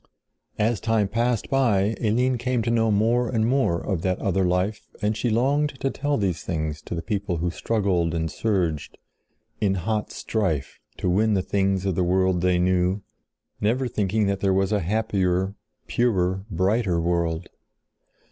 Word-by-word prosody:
As 110 0 +1
time 110 -3 +1
passed 115 +2 0
by 110 -6 +2
Eline 120 +3 +1
came 125 -1 0
to 115 - 0
know 115 -1 +2
more 115 +4 +2
and 110 -3 +1
more 125 -9 +2
of 95 -3 -2
that 95 0 0
other 95 0 0
life 90 +4 0
and 105 0 0
she 120 - -1
longed 135 +4 +1
to 135 - 0
tell 145 0 -1
these 95 -5 -1
things 80 -4 -3
to - - -4
the 85 - -4
people 100 -4 -2
who 85 +1 -1
struggled 90 -7 0
and 80 -1 -1
surged 85 -6 -1 0.6
in 95 -2 +1
hot 105 +4 -2
strife 85 -11 -2 0.2
to - - -2
win 105 +4 +3
the 95 - +1
things 95 -1 0
of 95 - +1
the 90 - +1
world 95 0 +2
they 90 0 +3
knew, 90 +2 +1 0.6
never 125 +5 +1
thinking 105 -1 0
that 100 -1 0
there 95 -1 +2
was 95 +1 +1
a 105 - +2
happier, 95 -1 0 0.3
purer, 95 -5 0
brighter 95 0 +1
world. 85 0 0
100 Hz, 165 wpm, -24 LUFS, 90-115 Hz, 0.6 s, win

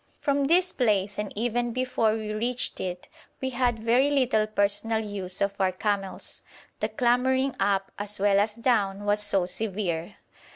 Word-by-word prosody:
From 280 -1 +1
this 355 +4 +3
place 205 -5 +1
and 210 -1 -3
even 240 +2 -1
before 250 -3 +1
we 215 -1 -3
reached 240 +3 -2
it 180 -1 -5 0.3
we 260 0 -2
had 245 -1 +1
very 240 +5 +3
little 255 -6 +2
personal 215 +2 0
use 200 -4 -4
of 200 0 +1
our 190 -1 +2
camels, 195 0 -3 0.4
the - - -1
clambering 260 +1 +2
up 195 -1 +1
as 205 0 -2
well 200 0 +4
as 210 +1 +1
down 210 -5 +1
was 205 0 +2
so 195 -3 +1
severe. 185 -2 -3
215 Hz, 160 wpm, -26 LUFS, 200-245 Hz, 0.4 s, well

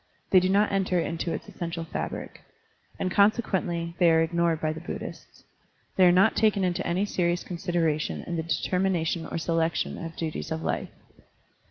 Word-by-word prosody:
They 185 - +8
do 185 +1 0
not 205 +2 +3
enter 190 -2 +1
into 165 0 -2
its - - -5
essential 170 -1 -5
fabric. - - -5 0.6
And 185 - -2
con 200 +3 +6
sequently 175 -7 -2
they 175 -2 +6
are 160 0 +4
ignored 170 -1 +1
by 155 -1 -1
the 160 - -7
Buddhists. 175 - -8 0.5
They 185 -1 +6
are - - +7
not 190 +5 +4
taken 215 -3 +3
into 180 +1 0
any 180 +4 +1
serious 175 -3 0
consideration 165 -3 -1
in 175 - -4
the 165 - -1
determination 170 0 0
or - - -4
selection 165 0 -1
of 165 0 -7
duties 160 -2 -4
of 160 0 -2
Ufe. - - -2
170 Hz, 175 wpm, -27 LUFS, 165-185 Hz, 0.6 s, They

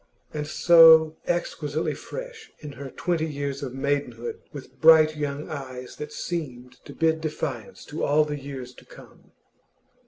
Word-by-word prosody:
And 150 -1 -4
so 160 -1 +7
exquisitely 160 -3 -2
fresh 470 -3 -9
in 150 - -9
her 140 0 -8
twenty 165 +2 -2
years 140 -2 -4
of 130 -3 -6
maidenhood, 135 -4 -3
with 135 -2 -11
bright 155 -1 +7
young 145 0 -4
eyes 130 -5 -8
that 150 0 -7
seemed 125 -9 -6
to - - -10
bid 160 -1 +1
defiance 145 -8 -5
to 150 - -6
all 150 +1 +3
the 150 -1 -5
years 135 -3 -8
to - - -17
come. - - -17
150 Hz, 150 wpm, -25 LUFS, 135-160 Hz, -, so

